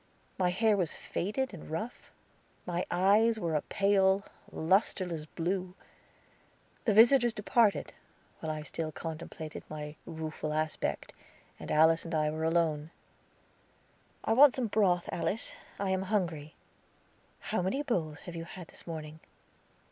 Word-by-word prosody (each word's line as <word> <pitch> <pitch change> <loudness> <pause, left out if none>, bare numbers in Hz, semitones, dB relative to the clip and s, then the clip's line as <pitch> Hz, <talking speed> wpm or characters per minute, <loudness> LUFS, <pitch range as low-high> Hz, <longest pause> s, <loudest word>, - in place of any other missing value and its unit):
My 180 -1 +3
hair 215 +4 +3
was 180 -5 -1
faded 215 +7 -2
and 170 - -9
rough; 215 +10 -5 0.6
my 175 0 -2
eyes 210 +5 +4
were 170 -6 -2
a 150 - +2
pale, 195 -1 +3 0.3
lusterless 175 -2 +1
blue. 180 +3 -2 1.1
The 220 - +3
visitors 240 +1 +6
departed, 215 0 +2 0.5
while 160 - -3
I 155 -1 -4
still 155 +1 -4
contemplated 160 -1 -7
my 150 0 -6
rueful 155 -1 -4
aspect, 155 0 -2 0.5
and - - -6
Alice 160 +1 +5
and 165 -1 -4
I 155 -1 +2
were 160 +1 -3
alone. 160 -2 +1 1.3
"I - - +2
want 270 +2 +7
some 255 - 0
broth, 195 -5 +2
Alice. 205 +5 -1 0.2
I 195 -1 -1
am 190 0 +1
hungry." 165 -8 -1 0.8
"How - - -2
many 225 +11 -1
bowls 160 - -2
have 175 - -8
you 165 0 -5
had 180 -1 -10
this - - -12
morning?" 155 -1 -6
175 Hz, 135 wpm, -31 LUFS, 160-205 Hz, 1.3 s, want